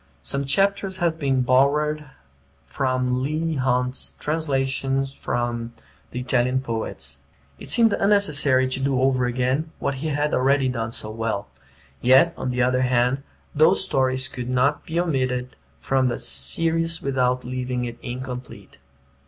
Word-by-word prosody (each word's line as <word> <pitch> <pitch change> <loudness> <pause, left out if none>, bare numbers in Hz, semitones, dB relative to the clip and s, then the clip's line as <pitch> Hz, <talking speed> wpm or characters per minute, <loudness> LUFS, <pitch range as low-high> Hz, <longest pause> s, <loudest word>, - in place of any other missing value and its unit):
Some 140 0 -1
chapters 195 +5 +1
have 165 -2 0
been 135 -3 +1
borrowed 145 +3 +2 0.6
from 130 -2 -1
Leigh 155 +4 -1
Hunt's 125 -1 0
Translations 135 -3 -1
from 120 -2 -3 0.4
the 125 - -5
Italian 125 0 +1
Poets. 110 - -5 0.4
It - - -9
seemed 230 -3 +4
unnecessary 150 -10 +3
to 130 - -2
do 135 -1 0
over 130 -1 +2
again 130 +6 -1
what 140 - -2
he 160 - -2
had 150 0 -1
already 135 +1 +2
done 115 -3 -3
so 110 -2 -3
well; 110 -2 -3 0.5
yet, 130 +7 +5
on - - -4
the 125 0 +1
other 125 +1 +2
hand, 125 +1 +1 0.3
those 155 +6 +4
stories 130 -6 +2
could 125 -1 -6
not 130 +3 +1
be 165 +1 -1
omitted 130 -6 -1 0.2
from 135 - +1
the 120 - -1
series 165 - +1
without 125 -2 0
leaving 125 0 -3
it 120 -1 -7
incomplete. 125 0 -7
130 Hz, 140 wpm, -23 LUFS, 125-145 Hz, 0.6 s, yet